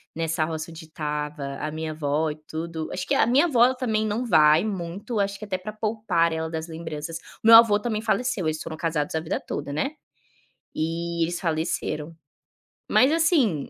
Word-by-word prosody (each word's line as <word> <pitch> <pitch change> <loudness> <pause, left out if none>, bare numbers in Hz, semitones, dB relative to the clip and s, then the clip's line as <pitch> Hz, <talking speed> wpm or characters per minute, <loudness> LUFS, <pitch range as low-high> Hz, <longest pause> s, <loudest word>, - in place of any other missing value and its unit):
nessa 165 -1 0
roça 160 +1 -5
onde 160 0 -10
estava 150 -2 -4
a 150 - -3
minha 160 0 -4
vó 155 +1 0
e - - -6
tudo 160 0 -4
acho 180 - -3
que - - +2
a - - +4
minha 265 +9 +4
vó 250 -3 +4
também 220 -4 -1
não 215 +3 -1
vai 155 -6 +5
muito, 200 +2 -4
acho 200 0 -1
que - - -9
até 190 -2 -2
para 190 +3 -7
poupar 215 -6 0
ela 160 0 -2
das 160 0 -4
lembranças. 160 -1 -6 0.3
O - - +1
meu 225 - +11
avô 220 -3 +6
também 215 -1 -2
faleceu, 225 -4 0
eles 155 0 -2
foram 160 - -6
casados 155 -2 -1
a - - +2
vida 160 0 -3
toda, 140 - -4
né. 155 - -1 0.8
E 170 +1 -2
eles 175 +1 -2
faleceram. 160 -1 -2 0.8
Mas 265 - +5
assim, 305 - +2
165 Hz, 190 wpm, -25 LUFS, 155-215 Hz, 0.8 s, meu